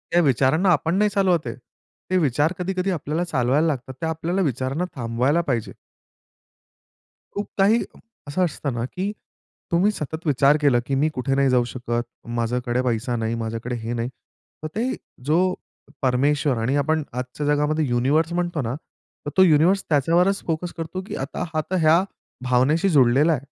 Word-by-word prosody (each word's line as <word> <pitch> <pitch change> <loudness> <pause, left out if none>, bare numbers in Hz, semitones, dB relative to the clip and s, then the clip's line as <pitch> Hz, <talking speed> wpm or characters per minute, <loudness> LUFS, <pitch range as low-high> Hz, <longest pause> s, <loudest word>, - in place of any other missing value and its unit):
या 175 - +6
विचारांना 145 +5 +3
आपण 165 +3 0
नाही 210 0 +3
चालवत 185 - +1
आहे. 115 - -4 0.5
ते 185 - +2
विचार 150 +2 +2
कधी, 185 +2 -2
कधी 185 +1 0
आपल्याला 160 +1 -2
चालवायला 145 0 +1
लागतात. 130 -3 -3
ते 165 - -1
आपल्याला 165 +4 -1
विचारांना 135 +3 -1
थांबवायला 125 +6 +1
पाहिजे. 115 -6 -1 1.6
खूप 205 - -3
काही 210 +4 +4 0.4
असं 165 +6 0
असतं 140 -5 -3
ना 120 0 -2
की 195 +3 -1 0.6
तुम्ही 180 +5 +3
सतत 160 -2 -6
विचार 140 +1 +4
केला 135 -4 +4
की 135 - -1
मी 150 +4 +2
कुठे 135 +1 -1
नाही 140 -1 +3
जाऊ 125 -1 +3
शकत, 120 -1 -3 0.2
माझ्याकडे 120 +1 -1
पैसा 120 0 -1
नाही, 115 0 -1
माझ्याकडे 115 +2 -4
हे 115 0 -4
नाही. 115 +1 -2 0.5
तर 155 - -2
ते 245 +4 -1 0.3
जो 155 +3 +3 0.6
परमेश्वर 140 +1 +2
आणि 115 +5 0
आपण 155 +2 +1
आजच्या 125 +4 -4
जगामध्ये 150 +1 +1
युनिव्हर्स 140 +7 +1
म्हणतो 175 -3 -1
ना, 115 +1 -3 0.5
तर 145 - -2
तो 190 - +8
युनिव्हर्स 175 +4 +4
त्याच्यावरच 170 +7 +2
फोकस 165 +2 -2
करतो 165 +3 -4
की - - -5
आता 145 - -5
हा 155 - +1
तर 185 -3 +1
या 165 +4 +5 0.4
भावनेशी 130 +9 +2
जुडलेला 140 +1 +4
आहे. 140 -2 -4
145 Hz, 165 wpm, -23 LUFS, 125-170 Hz, 1.6 s, तो